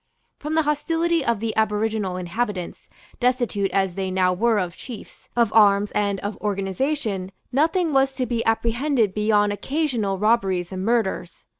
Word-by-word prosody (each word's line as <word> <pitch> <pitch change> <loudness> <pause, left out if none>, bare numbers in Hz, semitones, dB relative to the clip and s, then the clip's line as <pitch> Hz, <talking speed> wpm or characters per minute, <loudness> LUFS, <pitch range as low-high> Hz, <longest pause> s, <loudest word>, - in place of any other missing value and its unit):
From 300 +2 -3
the 320 - +3
hostility 325 +2 0
of 235 -4 0
the 225 0 -3
aboriginal 215 -3 0
inhabitants, 185 0 -4 0.3
destitute 240 -6 +1
as 190 -2 0
they 190 0 -3
now 185 -1 +2
were 225 +4 +2
of 180 -3 -2
chiefs, 240 -5 -11
of 235 -3 +2
arms 205 -2 +5
and 200 -1 0
of 205 +1 -4
organization, 200 0 -2 0.2
nothing 320 +4 +1
was 270 0 +3
to 260 -1 -1
be 235 -2 -1
apprehended 230 0 +1
beyond 210 -1 +2
occasional 240 -6 -1
robberies 195 -4 +1
and 185 0 -4
murders. 220 -5 -1
215 Hz, 150 wpm, -23 LUFS, 195-255 Hz, 0.3 s, arms